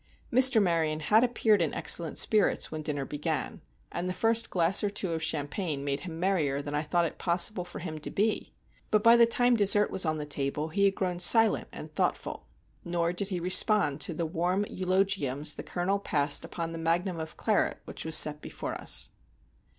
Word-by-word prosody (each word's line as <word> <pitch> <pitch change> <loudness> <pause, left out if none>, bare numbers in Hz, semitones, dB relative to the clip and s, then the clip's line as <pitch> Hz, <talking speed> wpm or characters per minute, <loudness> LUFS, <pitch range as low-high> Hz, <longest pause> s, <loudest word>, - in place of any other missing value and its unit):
Mr. 255 -1 +8
Maryon 165 -5 0
had 215 +9 +2
appeared 220 -5 +1
in 160 - -2
excellent 165 -3 +1
spirits 215 -3 +2
when 155 0 -5
dinner 145 -3 -3
began, 145 +1 -4 0.3
and 175 +1 -4
the 180 - -4
first 225 +2 0
glass 175 +3 +4
or 205 - 0
two 195 -3 -3
of 160 -1 -3
champagne 145 0 -3
made 140 0 -2
him 165 -3 -9
merrier 165 -7 -1
than 145 0 -6
I 150 - -1
thought 170 +3 -1
it 165 - -7
possible 180 +2 +1
for 175 - -10
him 160 -3 -7
to - - -4
be. 215 +2 -2 0.4
But 215 -1 +1
by 230 +1 +6
the 235 -1 +5
time 245 +1 +2
the 235 - 0
dessert 205 +1 +3
was 190 - -2
on 155 -2 -1
the 150 - -5
table 145 +1 -3
he 200 +5 0
had 195 0 +1
grown 180 -2 -3
silent 225 +5 +4
and - - -10
thoughtful; - - -3 0.4
nor 170 -1 -2
did 190 +2 -2
he 185 -3 -4
respond 180 -4 +2
to 165 - -1
the 170 - -3
warm 175 +5 -2
eulogiums 185 -7 -1
the - - -7
Colonel 190 +3 -3
passed 145 -6 0
upon 165 -1 -6
the 165 - -7
magnum 170 +2 -1
of 160 0 -8
claret - - -1
which - - -8
was 160 0 +1
set 150 -1 +4
before - - -7
us. - - 0
175 Hz, 205 wpm, -27 LUFS, 155-200 Hz, 0.4 s, Mr